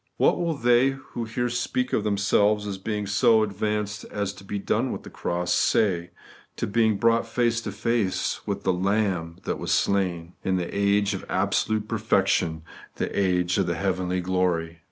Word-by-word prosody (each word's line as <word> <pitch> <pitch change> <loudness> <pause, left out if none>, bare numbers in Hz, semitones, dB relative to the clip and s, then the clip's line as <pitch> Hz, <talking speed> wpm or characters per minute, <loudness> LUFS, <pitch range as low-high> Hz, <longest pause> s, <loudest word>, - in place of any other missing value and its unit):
What - - +3
will 170 -2 0
they 120 0 +4 0.2
who 120 - -3
here 120 +2 -2
speak 120 +1 -2
of 105 - +1
them 105 -2 0
selves 105 +1 +2
as 100 -2 -4
being 105 +1 -3
so 110 +3 +4
advanced 105 +1 -2
as 100 -1 -3
to 100 - -13
be 100 +1 -4
done 110 +5 0
with - - -5
the - - -11
cross, 90 0 -1
say 90 -5 +2 0.5
to - - -2
being 110 0 +2
brought 115 +1 +2
face 115 0 +1
to - - -5
face 115 -5 -1
with - - -3
the 95 - +2
Lamb 95 -3 0
that - - -3
was - - -3
slain, 90 -4 0
in 95 -1 +1
the 90 -1 -4
age 100 0 +2
of 95 - -5
absolute 105 +3 0
perfec 110 -1 +1
tion, 80 -2 0 0.3
the - - -3
age 90 -2 +1
of 95 - +1
the 85 - 0
heavenly 90 -1 -1
glory 90 -3 -1
100 Hz, 185 wpm, -25 LUFS, 95-110 Hz, 0.5 s, they